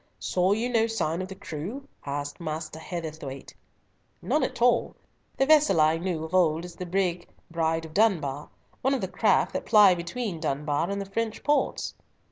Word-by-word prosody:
"Saw 185 +2 +1
you 225 +3 0
no 230 -2 +2
sign 180 -7 -1
of 185 - -4
the 190 - -8
crew?" 195 - -6 0.2
asked 145 +2 -4
Master 155 -1 -5
Heatherthwayte. 155 -6 -6 0.7
"None 305 - +1
at - - -2
all. 240 0 +3 0.4
The 270 - +3
vessel 300 - +5
I 155 +1 +4
knew 170 -3 -2
of 160 +2 -7
old 170 -2 +3
as 175 -1 -10
the 180 - -6
brig 180 -1 -1 0.2
Bride 165 -1 0
of 160 - -11
Dunbar, 160 -9 +1 0.3
one 265 +2 +2
of 260 - -2
the 190 - -1
craft - - +2
that - - -4
ply 210 -4 +7
between 175 +2 -4
Dunbar 150 +2 -1
and 200 0 -2
the 200 - -4
French 225 +1 -2
ports." 295 0 0
175 Hz, 180 wpm, -27 LUFS, 160-220 Hz, 0.7 s, ply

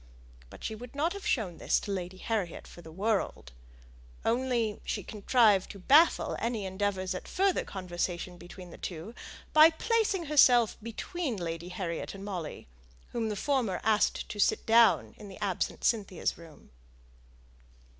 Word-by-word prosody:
But - - -13
she - - -3
would 240 +4 -10
not 320 +5 0
have 400 -1 -6
shown 190 - 0
this - - +2
to 205 - -5
Lady 185 -1 -4
Harriet 195 -4 -3
for 175 - -13
the 160 - -12
world; 195 - -1 0.7
only 235 -2 0
she 205 - -3
contrived 210 -1 +3
to - - -9
baffle 290 - +4
any 230 -3 -2
endeavours 190 0 -2
at 185 - -7
further 390 0 +1
conversation 180 -1 -4
between 175 0 -11
the - - -12
two, 175 +5 -6 0.4
by 310 +1 +9
placing 400 +1 0
herself 250 -6 +5
betwixt 235 - -4
Lady 170 0 -4
Harriet 180 -1 -4
and 195 0 -8
Molly, 180 -6 -5 0.5
whom 230 -2 -2
the 210 - -2
former 235 -5 0
asked 215 -1 +2
to 205 - -7
sit - - +2
down 230 0 +5
in 210 - -10
the 190 - -10
absent 200 -4 -2
Cynthia's 200 -6 0
room. 165 -3 -15
205 Hz, 155 wpm, -30 LUFS, 185-240 Hz, 0.7 s, by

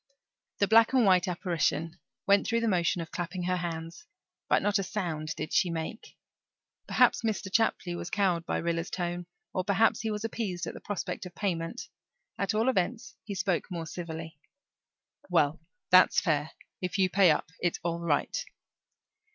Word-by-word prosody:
The 200 - +2
black 225 +3 +6
and 255 -4 +5
white 185 -1 +4
apparition 170 -2 -1 0.3
went 200 -1 +4
through 230 -1 +1
the 230 - +1
motion 175 -3 +1
of 160 - -13
clapping 175 +1 -4
her 180 +1 0
hands, 170 - -5 0.4
but - - +3
not 205 -1 +2
a - - 0
sound 160 -6 -3
did 155 - -5
she 180 - +3
make. 165 +7 -5 0.7
Perhaps - - +4
Mr. 210 -4 -2
Chapley 190 -5 +1
was 175 - -5
cowed 190 -6 +1
by - - 0
Rilla's 170 0 -1
tone 175 -1 -3 0.3
or 185 - 0
perhaps 200 +3 +3
he 220 - -2
was 210 0 -3
appeased 210 -6 -3
at - - -5
the - - -9
prospect 205 -2 -4
of 175 - -14
payment; 180 +2 -3 0.5
at 200 +2 0
all 220 +3 +2
events, 235 +2 0
he 205 - -5
spoke 175 -1 -1
more 170 -3 -4
civilly. 160 -2 -7 0.9
"Well, 155 -3 +2 0.3
that's 185 0 +7
fair. 155 -3 0 0.3
If 180 +1 -2
you 190 -1 +4
pay 185 0 +5
up 150 0 +1
it's 175 -1 0
all 170 0 -1
right." 160 -4 0
180 Hz, 170 wpm, -29 LUFS, 165-205 Hz, 0.9 s, that's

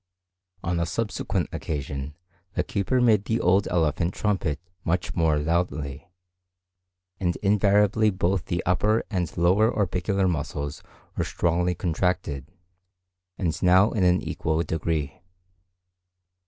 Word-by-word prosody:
On 85 0 -1
a 85 - 0
subsequent 105 +5 -2
occasion 70 -1 -4 0.4
the - - +1
keeper 100 +6 0
made 110 -5 +4
the 115 +1 0
old 95 +3 +3
elephant 85 +1 0
trumpet 95 -8 -1 0.2
much 90 +2 -1
more 80 -3 +2
loudly, 75 -1 -2 1.1
and 90 -2 0
invariably 105 +1 +3
both 95 -2 0
the 90 -2 -2
upper 105 +5 +2
and 90 -6 -2
lower 95 +6 +4
orbicular 95 0 0
muscles 75 -3 -3 0.3
were - - 0
strongly 90 +1 0
contracted, 80 -5 -1 0.9
and 85 -4 -2
now 95 +3 +5
in 105 - 0
an 90 0 +3
equal 80 +1 -1
degree. 80 -2 -2
90 Hz, 115 wpm, -25 LUFS, 80-100 Hz, 1.1 s, now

